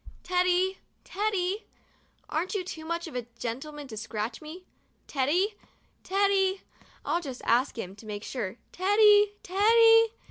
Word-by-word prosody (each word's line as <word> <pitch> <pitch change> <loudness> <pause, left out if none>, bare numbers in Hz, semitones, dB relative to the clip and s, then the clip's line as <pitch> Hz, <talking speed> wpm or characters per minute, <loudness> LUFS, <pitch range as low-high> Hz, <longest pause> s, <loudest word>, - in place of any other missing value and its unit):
Teddy! 365 +1 +1 0.2
Teddy! 400 0 -2 0.6
Aren't 350 +7 -2
you 390 - -1
too 320 -3 -8
much 335 +1 -3
of 320 - -9
a 245 -2 -4
gentleman 280 +6 -5
to 225 - -8
scratch 220 +1 -4
me? 325 +4 -10 0.4
Teddy! 320 +10 +1 0.5
Teddy! 390 0 +1 0.4
I'll 345 - 0
just 265 -6 -7
ask 250 +2 +2
him, 190 -3 -6
to 215 - -13
make 205 0 -5
sure! 225 -6 -4 0.2
Teddy! 410 +2 +5
Teddy! 455 +4 +5
355 Hz, 135 wpm, -28 LUFS, 260-395 Hz, 0.6 s, Teddy